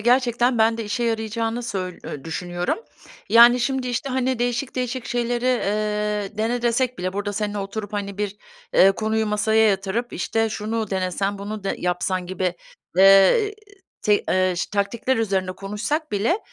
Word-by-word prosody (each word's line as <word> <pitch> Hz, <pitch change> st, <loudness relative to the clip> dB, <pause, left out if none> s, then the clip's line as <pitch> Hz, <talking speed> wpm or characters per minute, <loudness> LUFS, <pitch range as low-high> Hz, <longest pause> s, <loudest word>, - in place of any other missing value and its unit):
gerçekten 240 Hz, +1 st, +2 dB
ben 225 Hz, +1 st, +3 dB
de 225 Hz, -, -3 dB
işe 210 Hz, +4 st, -2 dB
yarayacağını 225 Hz, +1 st, -1 dB
söy 185 Hz, -5 st, -4 dB
eee, 140 Hz, -, -7 dB
düşünüyorum. 175 Hz, -, -2 dB, 0.5 s
Yani, 240 Hz, +2 st, +7 dB
şimdi, 260 Hz, 0 st, -1 dB
işte, 245 Hz, +3 st, -2 dB
hani, 260 Hz, -1 st, 0 dB
değişik 245 Hz, +2 st, -1 dB
değişik 250 Hz, -1 st, -3 dB
şeyleri, 240 Hz, 0 st, -1 dB
eee, 210 Hz, -3 st, -1 dB
dene 235 Hz, +2 st, 0 dB
desek 245 Hz, +1 st, +1 dB
bile 185 Hz, +1 st, -2 dB
burada 205 Hz, +1 st, -3 dB
seninle 210 Hz, 0 st, -2 dB
oturup, 205 Hz, +1 st, -5 dB
hani, 200 Hz, -1 st, -4 dB
bir, 205 Hz, -1 st, -2 dB, 0.4 s
eee, 195 Hz, +1 st, +7 dB
konuyu 220 Hz, +1 st, -1 dB
masaya 220 Hz, +1 st, +3 dB
yatırıp, 200 Hz, +5 st, -1 dB
işte, 225 Hz, +5 st, 0 dB
şunu 215 Hz, 0 st, -3 dB
denesen, 190 Hz, +1 st, -1 dB
bunu 205 Hz, 0 st, -6 dB
de -, -, -1 dB
yapsan 180 Hz, +1 st, -1 dB
gibi, 185 Hz, -1 st, -2 dB, 0.4 s
eee, 195 Hz, -, +6 dB, 0.5 s
te 210 Hz, -, +4 dB
eee, 185 Hz, -1 st, +2 dB
ş -, -, -3 dB
taktikler 220 Hz, +5 st, 0 dB
üzerine 190 Hz, -4 st, 0 dB
konuşsak 210 Hz, -, -3 dB
bile, 220 Hz, -, +1 dB
215 Hz, 155 wpm, -23 LUFS, 195-240 Hz, 0.5 s, Yani